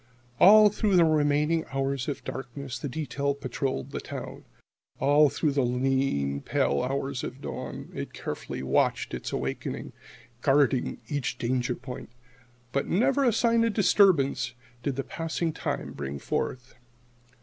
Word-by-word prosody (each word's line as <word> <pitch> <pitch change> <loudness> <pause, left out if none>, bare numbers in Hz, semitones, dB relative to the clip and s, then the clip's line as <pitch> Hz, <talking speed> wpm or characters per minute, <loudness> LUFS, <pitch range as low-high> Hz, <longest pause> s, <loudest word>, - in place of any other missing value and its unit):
All 210 +2 +9
through 205 -1 +1
the 170 -2 +6
remaining 150 +1 +2
hours 135 -1 -1
of 145 - -4
darkness 130 0 -6
the 145 - -4
detail 140 0 -2
patrolled 130 - -3
the - - -3
town. - - -7 0.5
All 145 +1 +5
through 150 +1 0
the 140 0 +1
lean, 125 - 0
pale 70 - +1
hours 135 0 -2
of 130 - -6
dawn - - -6
it - - -5
carefully - - -5
watched 65 - +1
its - - -4
wakening, 65 0 -4 0.5
guarded 135 -2 +2
each 145 -4 -2
danger 125 0 0
point. 130 0 -8 0.6
But 140 - -1
never 265 +8 +2
a 245 - +4
sign 230 +1 +3
of 230 -2 +1
disturbance 150 - +3 0.3
did 135 +2 -2
the 135 - -2
passing 165 +1 -3
time - - -3
bring 70 0 -5
forth. 125 - -3
140 Hz, 140 wpm, -27 LUFS, 125-160 Hz, 0.6 s, All